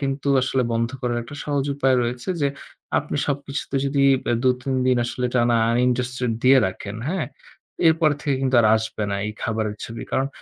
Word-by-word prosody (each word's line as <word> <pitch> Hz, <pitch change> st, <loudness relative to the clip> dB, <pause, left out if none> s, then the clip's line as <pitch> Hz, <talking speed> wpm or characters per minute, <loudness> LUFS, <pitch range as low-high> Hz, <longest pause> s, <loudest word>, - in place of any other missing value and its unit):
কিন্তু 135 Hz, 0 st, -2 dB
আসলে 130 Hz, 0 st, +1 dB
বন্ধ 115 Hz, 0 st, 0 dB
করার 120 Hz, -2 st, -1 dB
একটা 120 Hz, +5 st, -10 dB
সহজ 145 Hz, -2 st, 0 dB
উপায় 135 Hz, -2 st, +2 dB
রয়েছে 120 Hz, +4 st, -4 dB
যে 140 Hz, -, +3 dB, 0.5 s
আপনি 150 Hz, -, -4 dB
সবকিছুতে 140 Hz, -1 st, -3 dB
যদি 140 Hz, 0 st, +1 dB, 0.2 s
ব্যা -, -, +1 dB
দু, 130 Hz, -, +4 dB
৩ 135 Hz, 0 st, -2 dB
দিন 130 Hz, -1 st, +3 dB
আসলে 125 Hz, +1 st, -2 dB
টানা 120 Hz, -1 st, +3 dB, 0.2 s
uninterested 125 Hz, 0 st, 0 dB
দিয়ে 130 Hz, +1 st, +6 dB
রাখেন, 100 Hz, +2 st, -6 dB
হ্যাঁ? 175 Hz, -2 st, -1 dB, 0.6 s
এরপর 160 Hz, -1 st, +3 dB
থেকে 145 Hz, -2 st, 0 dB
কিন্তু 130 Hz, -1 st, 0 dB
আর 110 Hz, -, +4 dB
আসবে 110 Hz, 0 st, -4 dB
না 100 Hz, -, -1 dB
এই 105 Hz, -, -4 dB
খাবারের 110 Hz, -2 st, -1 dB
ছবি। 115 Hz, 0 st, -7 dB
কারণ 135 Hz, -, +1 dB
130 Hz, 185 wpm, -23 LUFS, 120-140 Hz, 0.6 s, দিয়ে